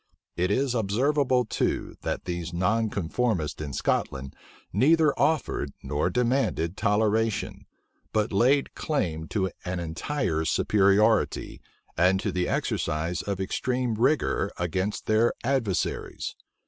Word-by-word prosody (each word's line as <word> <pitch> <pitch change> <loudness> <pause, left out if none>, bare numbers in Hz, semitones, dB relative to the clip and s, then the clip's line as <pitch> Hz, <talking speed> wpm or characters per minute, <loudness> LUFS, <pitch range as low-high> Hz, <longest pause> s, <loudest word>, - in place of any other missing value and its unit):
It 90 +1 0
is 130 +5 +1
observable 125 +4 +2
too, - - -1
that - - -3
these 85 -2 -4
nonconformists 100 -2 0
in 75 -2 -4
Scotland 65 0 -1 0.4
neither 150 - +4
offered 140 - 0
nor 75 +4 0
demanded 120 -6 0
toleration; 110 +1 0 0.4
but 105 -1 0
laid 130 +7 +3
claim 80 - -2
to 95 -1 -1
an 90 0 -3
entire 85 - -2
superiority, 105 +6 +2 0.3
and 90 +3 +3
to - - -1
the 90 -1 -1
exercise 80 +2 -1
of 100 -2 -3
extreme 125 +5 -1
rigor 115 -3 +1
against 95 +4 -2
their 110 +2 +3
adversaries. 120 -7 -1
105 Hz, 110 wpm, -26 LUFS, 85-125 Hz, 0.4 s, neither